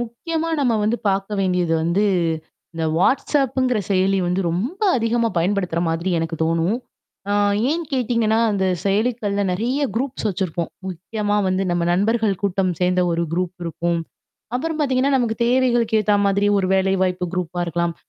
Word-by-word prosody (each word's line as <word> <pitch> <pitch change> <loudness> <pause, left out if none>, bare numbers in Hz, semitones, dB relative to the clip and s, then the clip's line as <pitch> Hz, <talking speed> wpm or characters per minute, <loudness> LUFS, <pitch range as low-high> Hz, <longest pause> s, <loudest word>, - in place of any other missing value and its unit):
முக்கியமா 320 +8 -3
நம்ம 250 -4 +2
வந்து 220 +3 +1
பார்க்க 195 +1 -1
வேண்டியது 180 -3 +1
வந்து, 170 +5 +1 0.7
இந்த 165 -1 -2
Whatsappங்கிற 260 +2 +1
செயலி 195 0 +2
வந்து 180 +2 0
ரொம்ப 235 - -3 0.2
அதிகமா 230 0 +1
பயன்படுத்துற 180 -1 0
மாதிரி 165 +3 -1
எனக்கு 165 0 -3
தோணும். 165 +6 +1 0.5
ஆ - - +2 0.4
ஏன் 335 +2 -1
கேட்டீங்கன்னா, 230 -3 +1
அந்த 195 -2 0 0.2
செயலிக்கள்ல 205 0 0
நெறைய 240 +9 -1
குரூப்ஸ் 255 -2 -2
வச்சுருப்போம். 180 -3 -2 0.2
முக்கியமா 205 +4 -2
வந்து 185 +1 0
நம்ம 175 0 0
நண்பர்கள் 215 +2 +1
கூட்டம் 190 -2 +1
சேர்ந்த 180 0 +2
ஒரு 170 0 0
குரூப் 180 0 -2
இருக்கும், 170 +1 -1 0.6
அப்பறம் 320 +5 -2
பார்த்தீங்கன்னா, 270 -1 +2
நமக்கு 235 -3 0
தேவைகளுக்கு 240 -3 +2
ஏத்தா 210 0 +3
மாதிரி 200 +1 +2
ஒரு 190 - 0
வேலைவாய்ப்பு 190 -1 +1
குரூப்பா 180 -1 -3
இருக்கலாம். 170 0 -1
200 Hz, 145 wpm, -21 LUFS, 180-235 Hz, 0.7 s, ஏத்தா